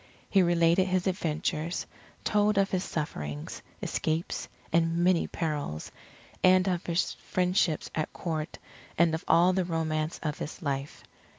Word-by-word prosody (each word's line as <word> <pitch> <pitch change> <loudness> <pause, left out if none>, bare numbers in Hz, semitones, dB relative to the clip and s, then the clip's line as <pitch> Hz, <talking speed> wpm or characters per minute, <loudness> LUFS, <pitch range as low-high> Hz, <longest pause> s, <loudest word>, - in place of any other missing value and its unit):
He 195 - +6
related 170 +1 +4
his 185 -1 0
adventures, 165 -3 -1 0.3
he - - -31
told 210 0 +2
of 195 0 +3
his 185 -1 0
sufferings, 75 - -4 0.2
escapes, 160 +2 -1 0.3
and 165 0 +3
many 175 0 +3
perils, 145 - -3 0.5
and 185 0 +6
of 180 -2 -1
his 170 +1 +1
friendships 180 -3 0
at 155 - -2
Court 160 -2 -4 0.4
and 170 -1 +4
of 160 - -2
all 175 +3 +5
the 190 0 +1
romance 160 -2 -1
of 150 -2 -2
his 150 - -5
life. 140 -1 -3
170 Hz, 140 wpm, -29 LUFS, 155-185 Hz, 0.5 s, He